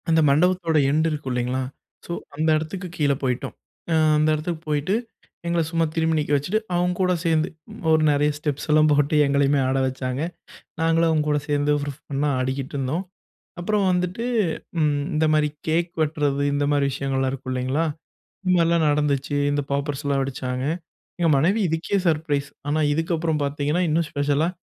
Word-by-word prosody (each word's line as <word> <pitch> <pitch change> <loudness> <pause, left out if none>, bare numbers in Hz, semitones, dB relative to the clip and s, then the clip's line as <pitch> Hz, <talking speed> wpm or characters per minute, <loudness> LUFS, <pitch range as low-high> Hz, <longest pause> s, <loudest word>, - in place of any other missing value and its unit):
அந்த 160 0 +4
மண்டபத்தோட 170 +2 +2
எண்ட் 155 +2 +2
இருக்கு 150 -3 -4
இல்லைங்களா, 125 +1 -1 0.4
ஸோ - - -7 0.2
அந்த 155 +2 0
இடத்துக்கு 180 +4 -5
கீழ 145 -2 +2
போய்ட்டோம். 125 -1 -2 0.4
அ - - +3 0.2
அந்த 155 +1 +3
இடத்துக்கு 160 +1 -4
போயிட்டு, 150 +6 +1 0.5
எங்கள 170 0 +1
சும்மா 165 0 +1
திரும்பி 160 -1 +1
நிக்க 150 -1 -2
வச்சுட்டு. 175 +10 0 0.2
அவங்க 180 +1 +1
கூட 185 -1 +3
சேர்ந்து 160 -1 +2 0.4
ஒரு 160 0 +4
நிறைய 145 +1 +2
ஸ்டெப்ஸ்லாம் 150 +1 +2
போட்டு 145 +1 +2
எங்களையுமே 140 0 +2
ஆட 130 +1 +1
வச்சாங்க. 130 +1 -3 0.6
நாங்களும் 165 0 +3
அவங்க 155 -2 +1
கூட 150 0 +2
சேர்ந்து 145 0 +2
ஃபண்ணா 145 0 -3
ஆடிட்டு 130 +1 -3
இருந்தோம். 140 +7 -1 0.6
அப்புறம் 205 +3 +1
வந்துட்டு 180 +5 -1 0.9
இந்த 155 +1 +2
மாதிரி 155 -1 +3 0.2
கேக் 170 +2 +1
வெட்டுறது 145 -2 0
இந்த 145 0 +1
மாதிரி 145 -1 +2
விஷயங்கள்லாம் 135 -1 -1
இருக்கு 135 -1 -6
இல்லைங்களா, 130 +5 0 0.6
இந்த 185 - +2
மாதிரிலாம் 170 -1 +3
நடந்துச்சு. 145 -1 0 0.2
இந்த 145 0 0
பாப்பர்ஸ்லாம் 140 0 -1
வெடிச்சாங்க. 130 -1 -3 0.5
எங்க 170 -1 +2
மனைவி 180 +11 +2
இதுக்கே 165 +5 -1
சர்ப்ரைஸ். 150 -3 0 0.2
ஆனா 155 +2 +1
இதுக்கப்புறம் 160 0 0
பார்த்தீங்கன்னா 145 +4 0
இன்னும் 160 +1 +1
ஸ்பெஷலா 145 +2 +1
150 Hz, 150 wpm, -23 LUFS, 140-165 Hz, 0.9 s, அந்த